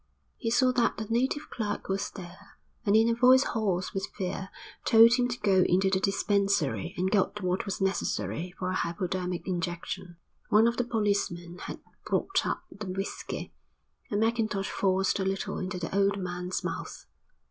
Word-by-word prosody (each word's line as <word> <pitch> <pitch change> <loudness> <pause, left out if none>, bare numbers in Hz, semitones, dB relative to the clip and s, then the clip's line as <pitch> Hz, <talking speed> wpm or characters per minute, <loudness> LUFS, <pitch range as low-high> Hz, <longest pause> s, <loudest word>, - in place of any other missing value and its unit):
He 230 - -2
saw 255 +2 +4
that 245 -2 +1
the 220 - -3
native 265 +5 0
clerk 215 -3 -3
was 195 +1 -1
there, 190 +1 -12 0.3
and 200 - +5
in 225 +1 +5
a 235 - +3
voice 255 +3 +6
hoarse 195 -5 -1
with 195 +1 -2
fear 190 -1 -3 0.3
told 230 +1 +7
him 245 0 +3
to 245 -1 -4
go 195 -3 +4
into 190 +2 +3
the 190 - +3
dispensary 195 -4 +1
and 185 +1 0
get 210 0 +1
what 180 +1 0
was 200 - -3
necessary 175 - -1
for 185 0 -2
a - - -2
hypodermic 180 +1 -2
injection. 175 0 -4 0.3
One 215 +2 +6
of 235 0 +1
the 245 - +1
policemen 200 -6 -1
had - - -7 0.2
brought 390 0 0
up - - -2
the 210 -1 -7
whisky, 190 +2 -5 0.6
and 205 - 0
Mackintosh 220 -3 0
forced 190 +1 +1
a - - +1
little 195 0 -2
into 185 0 -3
the 175 +1 -4
old 200 0 +3
man's 180 -1 -3
mouth. - - -5
195 Hz, 170 wpm, -29 LUFS, 185-220 Hz, 0.6 s, told